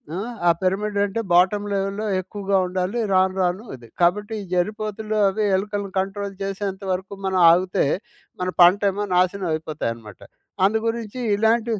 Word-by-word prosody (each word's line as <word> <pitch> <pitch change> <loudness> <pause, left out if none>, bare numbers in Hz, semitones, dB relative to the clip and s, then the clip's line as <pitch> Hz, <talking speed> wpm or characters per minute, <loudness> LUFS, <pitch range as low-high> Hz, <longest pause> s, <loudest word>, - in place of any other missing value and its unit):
ఆ! - - -3 0.3
ఆ - - +7
పిరమిడంటే 200 +2 0
బాటమ్ 185 +4 +4
లెవెల్‌లో 195 +2 -2 0.2
ఎక్కువగా 195 +1 -2
ఉండాలి. 185 +4 -2 0.2
రాను 185 0 +3
రాను 180 +3 0
అది. 120 -2 -15
కాబట్టి 205 +5 +2
ఈ - - -7
జర్రిపోతులు 215 +3 -2
అవి 205 +3 0
ఎలుకలను 200 0 -3
కంట్రోల్ 195 +1 -3
చేసేంత 195 0 -4
వరకు 185 +2 -3
మనం 190 -1 +1
ఆగుతే 180 0 +2 0.6
మన 180 - 0
పంటేమో 200 +3 +4
నాశనమయిపోతాయనమాట. 155 - -1 0.5
అందుగురించి 225 +2 -1
ఇలాంటివి, 225 +1 +1
195 Hz, 125 wpm, -22 LUFS, 185-210 Hz, 0.6 s, ఆ